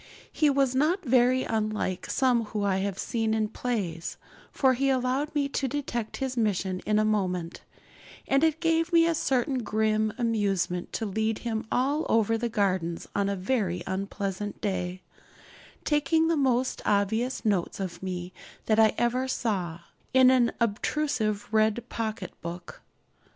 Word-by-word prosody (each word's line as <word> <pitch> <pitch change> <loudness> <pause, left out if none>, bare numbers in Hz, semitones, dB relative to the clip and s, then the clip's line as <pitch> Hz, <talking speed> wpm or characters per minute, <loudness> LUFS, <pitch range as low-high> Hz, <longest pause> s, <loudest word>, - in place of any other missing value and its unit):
He 300 - +3
was 275 -2 +2
not 315 +7 +1
very 255 +1 +4
unlike 215 -4 -2
some 245 -3 +2
whom 210 -1 -3
I 195 -1 +1
have 195 -1 -2
seen 225 0 -1
in 215 -1 0
plays, 200 -10 -3 0.3
for 265 -2 +3
he 270 +2 +1
allowed 265 +4 0
me 285 -1 +2
to 275 0 -1
detect 240 -5 -3
his 265 -1 -3
mission 195 -5 0
in 210 0 +3
a 215 - +3
moment; 180 -5 -1 0.7
and 275 +2 +3
it 320 -1 +2
gave 330 0 +1
me 335 -1 +5
a 335 - +2
certain 265 -3 0
grim 215 -1 +1
amusement 200 -7 0
to 225 - -2
lead 220 +2 -1
him 220 -2 -2
all 280 +5 +1
over 225 0 +3
the 235 +1 -1
gardens 185 -6 -1
on 200 0 +1
a 200 - -1
very 185 -3 -1
unpleasant 195 +1 -4
day, 185 -3 -3 0.8
taking 310 +2 +2
the 335 - +3
most 260 -3 +1
obvious 220 +6 0
notes 200 -4 0
of 175 -3 -5
me 180 -1 -5 0.3
that 215 0 +2
I 220 -1 +5
ever 250 +2 +1
saw, 185 -10 -2 0.3
in 260 -1 +7
an 245 -2 +4
obtrusive 220 -2 0
red 220 +2 +2
pocket 215 -4 -4
book. 170 +1 -8
220 Hz, 155 wpm, -27 LUFS, 200-260 Hz, 0.8 s, in